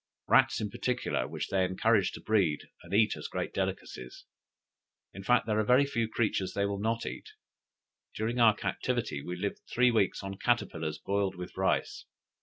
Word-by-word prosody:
Rats - - +4
in 105 -2 -3
particular, 125 +2 -1
which - - -5
they 95 -1 +2
encourage 100 +3 +2
to - - -8
breed, 95 -9 +1
and 85 - -14
eat 110 +2 +3
as - - -6
great - - -4
delicacies; 60 0 -4 0.9
in 95 - -8
fact, 125 +5 +3
there 110 -1 +1
are - - +3
very 125 +6 +5
few 115 -5 -1
creatures 105 -5 -1
they 100 - +1
will 100 -1 -2
not 115 +2 -1
eat. - - -6 0.9
During 115 +3 -2
our 110 -3 +6
captivity 70 - -2
we 90 +5 -5
lived 100 +3 -3
three 125 +1 +4
weeks 110 -5 +1
on 95 0 -6
caterpillars 80 -10 0
boiled 100 -1 -1
with 90 0 -8
rice. 95 0 0
100 Hz, 175 wpm, -30 LUFS, 95-115 Hz, 0.9 s, our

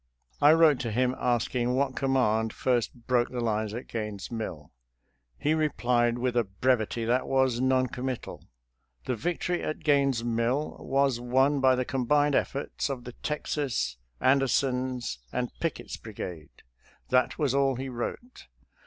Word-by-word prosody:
I 145 +2 +8
wrote 160 -4 +5
to 115 -4 -3
him 125 +3 +1
asking 120 0 0
what 135 0 0
command 110 -5 +1
first 120 -1 -1
broke 125 -2 +2
the 125 - -4
lines 110 -2 0
at 120 - -6
Gaines' 105 -3 -5
Mill. 90 -10 -5 0.7
He 150 - +1
replied 120 -6 +1
with 125 0 -1
a 120 - +3
brevity 115 +2 0
that 125 +3 +1
was 130 -2 +2
non 130 0 +3
committal: 125 0 -5 0.3
" - - -42
The 125 - -1
victory 175 +7 -2
at 155 +1 -4
Gaines' 140 -5 +2
Mill 120 +5 -1
was 135 -2 +1
won 130 +4 +2
by 130 -1 +5
the 125 0 -1
combined 145 +3 +2
efforts 140 +2 -1
of 130 -3 -4
the 125 -1 -8
Texas, 145 - -2 0.2
Ander 135 +1 +4
son's, 125 - -1
and 125 -1 -2
Pickett's 165 -2 -3
brigade." 90 -8 -8 0.5
That 125 0 +2
was 145 -4 +1
all 135 -1 +2
he 130 +2 -4
wrote. 130 - -6
125 Hz, 155 wpm, -28 LUFS, 115-135 Hz, 0.7 s, I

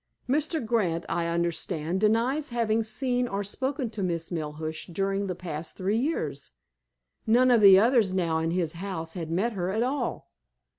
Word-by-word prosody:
Mr. 300 +1 0
Grant, 190 -8 0
I 170 -1 -1
understand, 170 +1 -1
denies 240 +8 +2
having 230 -2 +1
seen 245 +3 -1
or 200 -2 -2
spoken 260 +4 -2
to 215 -2 -5
Miss 170 -2 -2
Melhuish 155 -1 -4
during 195 +2 -1
the 180 - -3
past 165 -3 -6
three 200 +4 0
years. 155 - -2 0.7
None 250 +3 +5
of 235 -3 +5
the 195 -2 +9
others 225 -2 +4
now 170 -4 0
in 160 0 -1
his 170 -2 -1
house 170 -2 -5
had 165 -4 -5
met 200 +8 0
her 180 -3 -2
at 220 +4 0
all. 270 +3 -3
195 Hz, 165 wpm, -27 LUFS, 170-235 Hz, 0.7 s, the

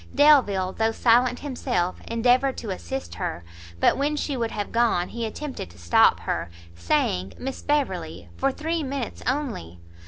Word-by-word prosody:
Delvile, 230 -11 +5
though 225 0 +1
silent 245 +2 +3
himself, 245 -10 -2
endeavoured 245 +3 +2
to 215 - -5
assist 265 +8 -5
her; 175 - -4 0.4
but - - +3
when 290 +2 +1
she 290 -1 -2
would 230 -2 -1
have 205 -2 -4
gone, 230 -7 +2
he 230 -1 -3
attempted 265 - -6
to 85 - -17
stop 85 -1 +4
her, 85 - -2 0.2
saying 90 +2 0
"Miss 265 +1 -5
Beverley, 295 -1 -1
for 275 0 +1
three 320 +4 -2
minutes 270 -4 -4
only." 245 - -2
240 Hz, 155 wpm, -25 LUFS, 185-275 Hz, 0.4 s, Delvile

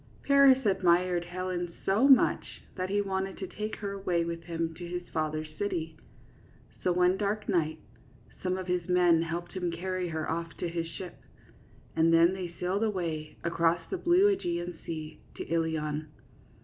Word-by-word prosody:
Paris 275 -2 +6
admired 180 -2 +3
Helen 175 -1 -4
so 215 +8 +4
much 270 -2 +4
that 185 0 -3
he 205 +1 +1
wanted 190 0 -2
to 195 - -4
take 210 +4 -5
her 200 -2 -4
away 180 -4 0
with 170 0 -4
him 165 -1 -2
to 175 +1 -8
his 175 0 -5
father's 155 -1 -2
city; 165 -6 -2 0.9
so 180 - +3
one 180 +1 +3
dark 210 +1 -1
night 160 -5 +1 0.6
some 185 0 0
of 185 - -4
his 180 -1 -1
men 175 -2 +5
helped 170 +1 -4
him 180 -2 -2
carry 185 +1 -2
her 160 -1 -3
off 165 -1 -3
to - - -2
his 165 -1 -3
ship, 175 +2 -8 0.8
and 165 +1 +4
then 165 +2 +6
they 185 -3 -5
sailed 190 +4 0
away 170 -7 -2
across 170 0 +1
the 380 - 0
blue 380 +4 +5
iEgean 175 - -4
sea 155 -2 -6
to - - -5
Ilion. 155 -2 -1
175 Hz, 165 wpm, -29 LUFS, 165-190 Hz, 0.9 s, Paris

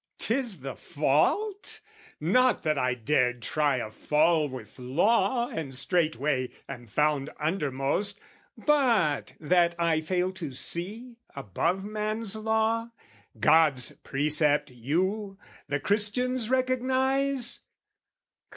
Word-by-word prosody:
'Tis 230 - -1
the 135 -1 -6
fault, 170 - 0 0.4
not 250 +11 +2
that 155 -2 +1
I 125 -2 0
dared 125 -1 0
try 145 -1 +1
a 110 -3 -4
fall 155 +5 +2
With 125 -3 -10
Law 200 - +2
and 140 -5 -5
straightway 150 -4 0 0.2
am 120 -3 -8
found 150 +4 0
undermost, 155 +5 -1 0.4
But 235 - +2
that 170 +2 +2
I 165 -2 +1
fail 180 +3 -1
to 165 -7 -7
see, 215 - -4 0.2
above 170 - -1
man's 215 +1 -3
law, 220 +1 0 0.5
God's 150 -6 +4
precept 150 0 +2
you, 190 - -2 0.3
the 145 0 -1
Christians 220 - -1
recognise? 260 0 +1
170 Hz, 105 wpm, -27 LUFS, 145-220 Hz, 0.5 s, God's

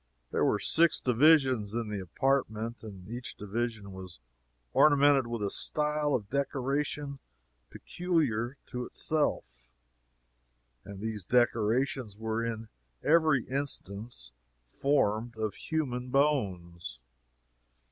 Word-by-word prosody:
There - - +1
were - - +3
six 165 0 +3
divisions 130 -5 +4
in 115 -2 -2
the 105 -1 -3
apartment, 115 +3 -1
and 95 -4 -10
each 120 +3 -6
division 110 0 -3
was 95 -2 -9 0.6
ornamented 145 -3 +5
with 115 -2 -3
a 100 - -1
style 150 -1 0
of 105 -5 -3
decoration 140 +1 -1 0.5
peculiar 140 -9 -1
to 125 -1 -5
itself 65 - -2 1.2
and 100 -1 -9
these 110 -4 -4
decorations 120 -1 +1
were 110 +1 -2
in 115 -1 -4 0.3
every 155 -5 +4
instance 120 - -4 0.3
formed 115 - 0
of 110 -2 -2
human 125 -1 -3
bones! 95 - 0
120 Hz, 105 wpm, -30 LUFS, 105-140 Hz, 1.2 s, ornamented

